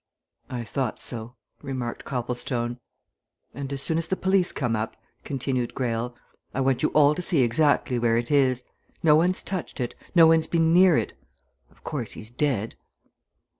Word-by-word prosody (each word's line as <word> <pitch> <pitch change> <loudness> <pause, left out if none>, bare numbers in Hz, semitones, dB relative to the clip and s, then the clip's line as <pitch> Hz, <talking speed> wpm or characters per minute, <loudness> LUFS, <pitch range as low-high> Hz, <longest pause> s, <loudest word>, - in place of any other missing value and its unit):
"I 120 -2 -4
thought 125 +1 -3
so," 120 0 -5 0.3
remarked 130 -4 -5
Copplestone. 120 -1 -2 0.7
"And 140 +1 -6
as 140 0 -2
soon 160 0 +1
as 165 - -2
the 190 - 0
police 190 -1 +2
come 120 -4 -1
up," 110 +1 -3 0.3
continued 130 -3 -2
Greyle, 120 -1 -2 0.4
"I - - -1
want 135 -1 +1
you - - +2
all 150 -1 +6
to 180 - -4
see 170 -5 +3
exactly 125 0 +2
where 115 -1 +2
it 120 +3 -2
is. 130 -3 +3 0.4
No 155 -2 +6
one's 180 +4 +2
touched 185 -6 -5
it 120 -2 -2 0.2
no 165 -2 +8
one's 160 0 +4
been 165 -1 +2
near 180 -2 +6
it. - - -2 0.6
Of - - -27
course, - - -4
he's 110 - -9
dead!" 120 -5 -1
135 Hz, 170 wpm, -25 LUFS, 120-160 Hz, 0.7 s, no